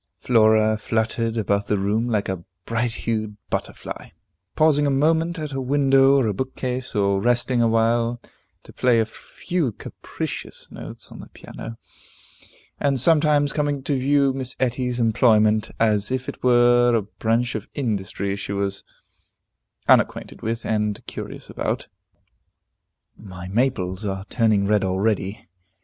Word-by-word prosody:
Flora 110 -2 +3
fluttered 115 +1 -1
about 100 -1 0
the 105 - +1
room 105 +4 0
like 105 -3 0
a 95 -3 -4 0.2
bright 115 +1 -1
hued 110 -2 -2
butterfly, - - -5 0.5
pausing 150 -2 +3
a - - +2
moment 160 +5 +2
at 150 -3 -5
a 135 - -2
window 135 0 +4
or 135 -3 +3
a 105 - 0
bookcase, 130 +2 -4
or 100 -1 +2
resting 120 +1 +2
awhile 115 +1 +2 0.4
to - - -14
play 125 -2 +3
a 110 - +2
few 155 +5 -3
capricious - - -7
notes - - -8
on - - -10
the - - -11
piano, 115 - -9 1.0
and 140 -2 +1
sometimes 150 -1 +3
coming 145 -2 -1
to 140 - 0
view 140 +1 +2
Miss 130 -1 -3
Etty's 125 -1 -1
employment, 110 -2 +3
as 105 -2 +3
if 130 0 -2
it - - -7
were 120 -1 +4
a 110 - +1
branch 115 +4 -1
of 110 - -5
industry 100 -5 -2
she 100 0 -5
was 100 -1 -2 1.0
unacquainted - - +2
with, 115 +1 -3
and 105 -1 -1
curious - - -7
about. - - -3 1.3
The 95 -3 -9
maples 100 -5 0
are 95 -1 -3
turning 110 -4 +2
red 105 0 +2
already. 95 +1 -1
115 Hz, 140 wpm, -23 LUFS, 105-130 Hz, 1.3 s, window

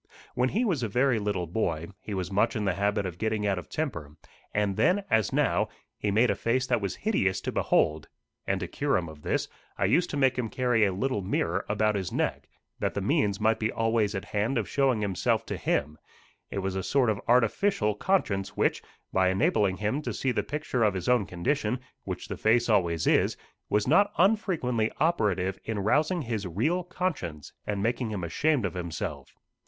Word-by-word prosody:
When 125 +1 +1
he 230 - +1
was 175 - 0
a 115 - 0
very 125 +2 +2
little 100 -4 -1
boy, 85 -3 -2
he 105 - -6
was 95 0 -3
much 105 +6 +2
in 105 -2 -1
the 95 - +2
habit 100 +1 0
of 90 -2 -6
getting 110 -1 -1
out 100 -2 +1
of 90 - -11
temper, 85 - -4 0.4
and 105 -2 0
then 195 - +3
as 110 -3 +3
now, - - +1 0.3
he 105 - -2
made 110 +3 +3
a - - 0
face 125 +2 0
that 120 -3 +1
was 100 -2 -2
hideous 95 - 0
to - - -3
behold; 75 0 +1 0.4
and 95 0 +1
to 90 - -3
cure 140 +7 0
him 85 -3 -3
of 80 -1 -11
this, - - -1 0.3
I - - +1
used 175 0 +3
to 145 - -3
make 130 -2 +2
him 115 -3 -1
carry 125 -3 +2
a 100 - +1
little 105 +3 -1
mirror 90 -1 -1
about 105 +1 +2
his 95 -3 -3
neck, - - -2 0.3
that - - -1
the - - -1
means 100 -2 +1
might 110 +1 +2
be 110 0 0
always 115 -2 +1
at 95 +1 -4
hand 105 +6 -1
of 110 -4 -1
showing 130 -4 +1
himself 100 -3 0
to - - -4
him: 75 +2 -1 0.5
it - - -5
was 95 0 -2
a 95 - -1
sort 125 +1 +2
of 105 - -3
artificial 120 - +3
conscience 105 - 0
which, - - +1 0.3
by 95 -1 +3
enabling 95 0 +2
him 110 +8 -1
to - - -4
see 130 - 0
the 120 - 0
picture 145 -5 -2
of 105 -3 +2
his 90 -2 -4
own 120 -5 +3
condition, 120 +6 -1 0.3
which - - -5
the - - -5
face 115 +2 +3
always 85 -6 +2
is, - - +3 0.3
was 105 +2 +1
not 190 +8 +4
unfrequently 175 - +2
operative 100 - +1
in 110 -1 -3
rousing 150 - +1
his 110 -5 -3
real 150 - 0
conscience, 160 - -4
and 100 -1 -1
making 120 +1 0
him 100 -4 -4
ashamed 130 - +1
of 100 - -2
himself. 85 -3 -5
110 Hz, 205 wpm, -28 LUFS, 95-130 Hz, 0.5 s, not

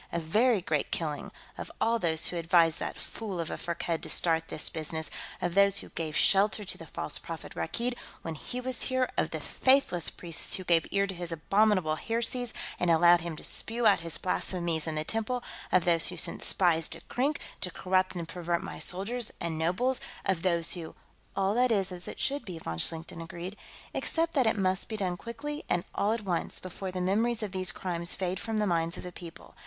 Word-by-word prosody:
A - - -1
very 215 +7 +3
great 150 -4 -1
killing: 155 -3 -2 0.3
of - - -5
all 230 0 +2
those 160 -4 +1
who 175 - -4
advised 165 -1 +4
that - - -4
fool 205 -6 -6
of 165 - -3
a - - -2
Firkked 170 -1 -2
to - - -5
start 165 -1 +3
this - - +4
business; 160 0 -2 0.3
of 175 -1 -1
those 200 +1 +5
who - - -4
gave 155 -2 -3
shelter 205 +2 +4
to - - -1
the - - -10
false - - -2
prophet, - - -7
Rakkeed, 240 +1 -1 0.3
when 165 - -4
he 245 +10 -5
was 255 0 -1
here; 260 -1 +1
of - - +1
the - - -4
faithless 260 - +2
priests 170 -3 0
who 185 - -4
gave 170 -2 +3
ear 200 0 +2
to 195 - -4
his 175 -1 -3
abominable 185 -1 +2
heresies 235 +3 0 0.3
and 175 - +1
allowed 170 +1 +6
him 170 -1 -4
to - - -11
spew 230 +1 -2
out 200 -4 +6
his 165 -1 -3
blasphemies 170 -3 0
in 160 - -2
the 155 - 0
temples; 225 +7 -1 0.3
of 185 - +4
those 170 -2 +5
who 180 - -3
sent - - 0
spies 165 -4 +3
to 165 - -4
Krink, 280 +4 -1 0.2
to 180 - 0
corrupt 185 +1 0
and 170 -2 -4
pervert 170 0 -2
my - - -7
soldiers 215 +6 0
and 170 -2 -2
nobles; 180 +11 +1 0.3
of 190 -4 +1
those 170 -2 +2
who...." 165 -3 -6 0.4
"All 195 +1 +1
that 250 +2 +3
is 195 -4 +1
as 180 0 -8
it - - -7
should 280 +1 -1
be," 180 -4 -7
von 80 - -5
Schlichten 165 - -1
agreed. 175 +4 -6 0.4
"Except 330 0 0
that 265 -6 +3
it 220 - +2
must 190 -1 0
be 220 - -3
done 185 -3 -1
quickly 295 - -6
and 175 - +1
all 205 - +1
at 225 0 -1
once, 175 -3 -1
before 185 +1 -6
the 185 0 -3
memories 220 +5 +1
of 205 - -3
these 185 -1 0
crimes 170 -2 +2
fade 185 0 -2
from 225 -1 -3
the 210 - +2
minds 170 -2 0
of - - -7
the 180 - -6
people. 170 -1 -11
180 Hz, 215 wpm, -29 LUFS, 170-215 Hz, 0.4 s, allowed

